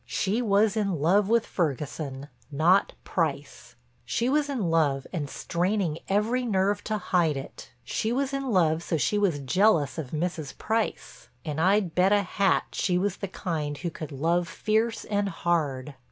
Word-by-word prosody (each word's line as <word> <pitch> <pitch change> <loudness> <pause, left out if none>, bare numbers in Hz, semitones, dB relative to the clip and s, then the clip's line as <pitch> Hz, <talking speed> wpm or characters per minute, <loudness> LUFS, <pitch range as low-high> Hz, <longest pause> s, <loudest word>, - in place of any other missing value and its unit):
She 205 +5 0
was 210 -1 +3
in 200 -4 0
love 190 +7 +3
with 230 0 +3
Ferguson, 145 -3 -3 0.2
not 170 +7 +3
Price; - - -3 0.3
she 235 +1 -1
was 290 +1 +1
in 220 -12 -1
love 145 -5 +2
and 150 -5 -3
straining 175 -1 -1
every 220 +6 +1
nerve 205 -2 +1
to 215 0 -1
hide 175 -6 +1
it; 135 - -9
she 220 - -2
was 275 +2 -1
in 275 -1 -2
love 165 -6 +2
so 170 - -1
she 205 +7 +1
was 190 -7 +2
jealous 160 +2 +2
of 145 -5 -5
Mrs. 160 -1 -3
Price—and 170 -7 -3
I'd 190 -1 +2
bet 185 +2 +3
a 205 -1 +4
hat 195 +1 +1
she 180 -2 0
was 195 +1 -1
the 200 - -4
kind 155 -6 -3
who 170 - -4
could 155 -1 -7
love 170 +5 0
fierce 220 +4 0
and 205 -1 0
hard. 150 -6 -1
180 Hz, 165 wpm, -27 LUFS, 155-210 Hz, 0.3 s, a